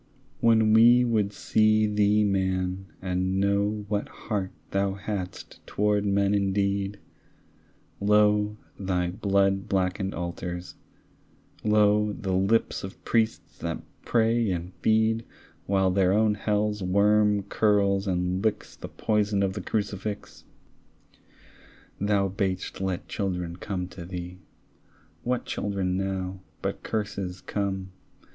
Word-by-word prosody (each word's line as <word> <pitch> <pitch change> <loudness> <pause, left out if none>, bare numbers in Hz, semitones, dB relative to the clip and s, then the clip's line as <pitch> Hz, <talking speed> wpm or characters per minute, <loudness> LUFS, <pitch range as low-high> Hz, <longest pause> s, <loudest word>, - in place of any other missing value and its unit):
When 110 -2 +4
we 120 +2 +7
would 110 -4 +1
see 110 +1 +3
thee 105 0 +3
man, 95 -1 0 0.2
and 95 +1 0
know 100 +1 +1
What 105 0 -2
heart 100 -4 -3 0.2
thou 100 0 0
hadst 100 -3 -6
toward 105 0 +1
men 100 0 +2
indeed, 100 0 0 1.0
Lo, 105 +1 +3 0.2
thy 90 -2 -1
blood 100 +1 +1
blackened 95 +1 0
altars; 90 0 -5 0.9
lo, 105 0 +3
The 95 -5 -3
lips 95 +5 +1
of 95 - -9
priests 110 -1 0
that 85 -1 -4 0.2
pray 115 -1 +2
and 90 0 -3
feed 110 +1 +2 0.4
While 95 -1 +2
their 95 0 +3
own 110 0 +3
hell's 105 0 0
worm 105 +2 +3
curls 100 -1 +2
and 90 +1 0
licks 110 -2 -1
The - - -8
poison 105 -2 0
of 95 -1 0
the 100 - -5
crucifix. 100 0 -4 1.5
Thou 100 -1 +2
bad'st 95 -1 -3
let 95 -2 -2
children 90 -4 -3
come 90 -2 -4
to 90 -1 -9
thee; 90 0 -7 0.8
What 125 0 -1
children 95 -3 -2
now 95 -1 -3 0.2
but - - -2
curses 100 -4 -3
come? 95 0 -3
100 Hz, 115 wpm, -26 LUFS, 95-105 Hz, 1.5 s, we